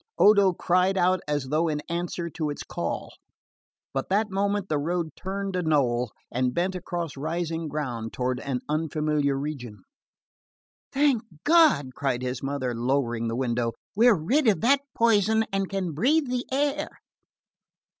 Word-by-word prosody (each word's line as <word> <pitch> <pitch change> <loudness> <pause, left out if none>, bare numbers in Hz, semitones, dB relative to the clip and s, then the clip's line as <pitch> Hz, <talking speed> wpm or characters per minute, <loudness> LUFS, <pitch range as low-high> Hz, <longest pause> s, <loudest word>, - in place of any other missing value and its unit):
Odo 200 -2 +6
cried 180 +2 +1
out 185 +1 +3
as 145 -3 -1
though 155 +3 +2
in 150 -2 -1
answer 170 0 -3
to 155 -2 -3
its 145 - -5
call; - - -4 0.8
but 135 - -2
that 210 +2 +1
moment 200 0 0
the 150 -4 0
road 170 +2 -1
turned 195 0 -4
a 180 - +1
knoll 125 -7 +1 0.2
and 125 0 0
bent 180 +2 0
across 175 -3 -4
rising 165 +2 -3
ground 125 -7 -4
toward 125 0 -1
an 130 -2 -3
unfamiliar 150 -2 0
region. 135 -7 -6 1.1
"Thank 275 -4 +3 0.2
God!" 300 - +4
cried 130 -2 -1
his 125 0 -3
mother, 135 -3 -2
lowering 120 -1 0
the 115 - -2
window, 120 -2 -1 0.2
"we're 230 +1 +6
rid 240 - +1
of 210 - +3
that 270 +5 +4 0.2
poison 220 -1 +3
and 195 -1 0
can 190 -3 -2
breath 280 - +2
the 250 -1 -3
air." 290 +2 0
165 Hz, 150 wpm, -26 LUFS, 135-200 Hz, 1.1 s, Odo